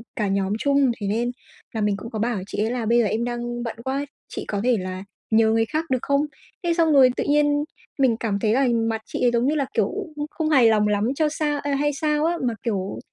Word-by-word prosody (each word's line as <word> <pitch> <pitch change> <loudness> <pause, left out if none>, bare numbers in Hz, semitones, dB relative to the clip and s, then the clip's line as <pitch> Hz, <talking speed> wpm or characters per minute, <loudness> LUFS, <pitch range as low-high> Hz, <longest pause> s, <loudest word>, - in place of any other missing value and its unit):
cả 210 - 0
nhóm 195 0 0
chung, 280 -2 +3
thế 200 - -2
nên 235 +4 0 0.4
là 220 - -2
mình 205 -1 +1
cũng 230 - -8
có 220 - -4
bảo 230 -1 0
chị - - -6
ấy 220 - -1
là: 245 -2 -2
"Bây 235 +2 +3
giờ 230 - +3
em 220 +3 0
đang 240 0 -3
bận 230 - -4
quá, 275 +2 -1 0.2
chị - - -6
có 205 -1 -2
thể 245 -1 +3
là 185 +1 -5 0.3
nhờ 220 0 +4
người 225 0 +2
khác 310 +7 -2
được 255 -2 +1
không?" 280 +1 +1 0.4
Thế 340 -1 +2
xong 330 -2 +3
rồi 265 -2 +7
tự - - -1
nhiên 290 0 +3 0.4
mình 245 -4 +3
cảm 210 -4 -1
thấy 215 +1 +1
là 265 +1 +3
mặt 225 -1 0
chị - - -5
ấy, 240 - +4
giống 235 +2 +2
như 305 - +1
là, 280 - +1
kiểu, 210 -3 +1 0.3
không 295 - -2
không 315 -1 -2
hài 260 -6 +6
lòng 210 -1 +3
lắm 210 +2 +1
cho 310 +1 +2
sao, 295 -1 -1
ơ, 285 -1 -1
hay 290 +1 +1
sao 300 +1 0
á, 340 +1 +1
mà, 235 - 0
kiểu, 200 -5 -2
240 Hz, 260 wpm, -23 LUFS, 220-285 Hz, 0.4 s, rồi